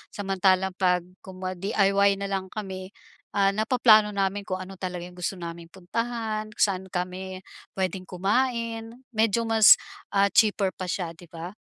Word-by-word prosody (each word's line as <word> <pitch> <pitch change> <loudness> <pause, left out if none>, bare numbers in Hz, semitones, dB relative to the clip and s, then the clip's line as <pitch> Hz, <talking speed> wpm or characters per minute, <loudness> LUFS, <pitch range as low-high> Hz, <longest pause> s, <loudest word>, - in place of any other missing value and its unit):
samantalang 190 -1 +1
'pag 180 -2 +3 0.2
kumwari 185 0 -6
DIY 200 0 +2
na 200 - -3
lang 195 -1 -2
kami 190 -3 -6 0.4
ah 195 -1 +4
napaplano 215 -1 +4
namin 195 0 -1
kung 185 - -1
ano 190 0 -11
talaga 180 -2 -4
yung 180 0 -11
gusto 180 +2 -2
naming 170 -1 -8
puntahan 215 +4 -3
kung - - +3
saan 190 -2 0
kami 185 +1 -5 0.3
pwedeng 185 -1 -2
kumain, 230 +3 -1 0.2
medyo 225 0 +2
mas 225 -2 +7 0.3
ah 200 0 +2
cheaper 205 -3 +3
pa 185 - -6
siya 175 -2 -2
'di 170 +1 -15
ba? 170 +4 -8
195 Hz, 155 wpm, -26 LUFS, 185-215 Hz, 0.4 s, mas